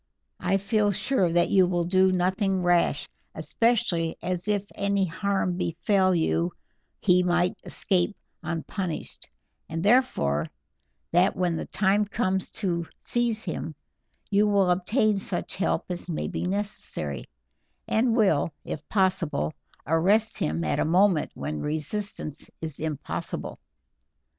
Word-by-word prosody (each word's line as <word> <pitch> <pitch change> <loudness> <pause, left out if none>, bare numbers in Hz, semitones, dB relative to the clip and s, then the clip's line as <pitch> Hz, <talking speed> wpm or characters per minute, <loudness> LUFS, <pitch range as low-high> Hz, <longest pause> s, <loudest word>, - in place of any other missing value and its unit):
I 185 +2 +1
feel 205 +1 +1
sure 190 -3 +1
that 175 +1 +2
you 190 -2 +5
will 175 -1 0
do 185 +1 +4
nothing 185 +1 +1
rash, 175 -1 +2 0.3
especially 185 -8 +1
as 180 +1 -2
if 205 -1 +1
any 200 -1 +1
harm 185 +1 -1
befell 185 +2 +2
you 170 +1 +1 0.5
he 180 -2 +4
might 175 0 +1
escape 185 +1 0 0.3
unpunished, 170 +2 -4 0.4
and 165 +1 -3
therefore 200 - +2 0.6
that 175 +3 +3
when 180 -2 0
the - - -4
time 205 +1 +2
comes 190 -3 -1
to 170 -3 0
seize 235 -2 0
him 165 -3 -4 0.6
you 205 +1 +4
will 200 -3 +3
obtain 205 +3 +2
such 190 -2 -2
help 195 - 0
as 175 0 -4
may 160 - -2
be - - -3
necessary, 185 - -3 0.6
and 230 +1 +2
will, 190 -9 +3
if 150 - -6
possible, 185 - +1 0.3
arrest 195 +8 +2
him 80 +2 -1
at 75 - 0
a - - +3
moment 180 0 +3
when 75 0 -4
resistance 155 +1 -3
is 155 -3 -5
impossible." 155 -2 -4
185 Hz, 130 wpm, -26 LUFS, 165-200 Hz, 0.6 s, you